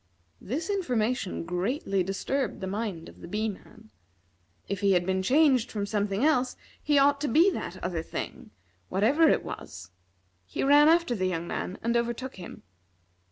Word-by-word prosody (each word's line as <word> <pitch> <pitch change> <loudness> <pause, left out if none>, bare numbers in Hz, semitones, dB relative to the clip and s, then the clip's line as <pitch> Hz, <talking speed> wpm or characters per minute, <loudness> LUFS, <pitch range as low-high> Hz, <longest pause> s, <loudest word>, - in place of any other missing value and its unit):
This 300 - -3
information 250 - -1
greatly 195 - -1
disturbed 200 +7 -2
the 190 - -4
mind 195 -4 -4
of - - -14
the - - -8
Bee 215 +4 -1
man. 220 +2 -12 0.8
If 200 -1 -3
he 200 0 +3
had 175 -1 +2
been 190 0 0
changed 260 +1 +3
from 205 -2 -2
something 205 +3 0
else, 260 -5 +2 0.3
he 295 -1 +2
ought 280 0 +4
to 300 - 0
be 330 - +5
that 185 - -5
other 175 -2 -2
thing, - - -6 0.4
whatever 275 - +4
it - - +2
was. 90 +1 -8 0.5
He 90 - -4
ran 290 +2 +6
after 335 -5 +3
the 185 -5 0
young 170 -2 -2
man, 180 +3 -4
and 235 +1 0
overtook 240 +2 -2
him. 180 - -10
220 Hz, 165 wpm, -27 LUFS, 190-275 Hz, 0.8 s, ran